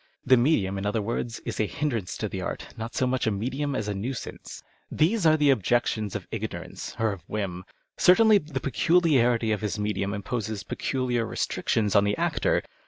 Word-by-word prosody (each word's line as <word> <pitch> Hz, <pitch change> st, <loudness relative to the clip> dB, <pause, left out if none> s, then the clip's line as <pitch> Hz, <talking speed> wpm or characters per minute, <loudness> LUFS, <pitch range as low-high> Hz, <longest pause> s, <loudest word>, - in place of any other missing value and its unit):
The 130 Hz, -, +6 dB
medium, 115 Hz, -7 st, +2 dB
in 100 Hz, -, -4 dB
other 105 Hz, +2 st, 0 dB
words, 115 Hz, +2 st, -3 dB
is -, -, -4 dB
a 110 Hz, -, +2 dB
hindrance 120 Hz, -11 st, -2 dB
to -, -, -2 dB
the -, -, -5 dB
art, -, -, -5 dB
not 115 Hz, +1 st, -6 dB
so 130 Hz, -, +2 dB
much 125 Hz, -2 st, 0 dB
a -, -, +3 dB
medium 130 Hz, +7 st, -2 dB
as 110 Hz, -4 st, -2 dB
a 105 Hz, -, -1 dB
nuisance. 115 Hz, +6 st, -6 dB, 0.3 s
These 175 Hz, +3 st, +2 dB
are 155 Hz, 0 st, +5 dB
the 145 Hz, -2 st, +4 dB
objections 110 Hz, -3 st, 0 dB
of -, -, -5 dB
ignorance -, -, -5 dB
or 110 Hz, -1 st, +1 dB
of 100 Hz, -3 st, -7 dB
whim. 95 Hz, -4 st, -4 dB, 0.3 s
Certainly 215 Hz, +3 st, +6 dB
the 150 Hz, -4 st, -5 dB
peculiarity 130 Hz, -7 st, +2 dB
of 105 Hz, -, -1 dB
his 105 Hz, 0 st, -2 dB
medium 105 Hz, -1 st, -1 dB
imposes 105 Hz, 0 st, -3 dB
peculiar 125 Hz, -3 st, -1 dB
restrictions 105 Hz, -1 st, -1 dB
on 100 Hz, -, +6 dB
the 100 Hz, 0 st, 0 dB
actor. -, -, +1 dB
115 Hz, 185 wpm, -26 LUFS, 105-135 Hz, 0.3 s, The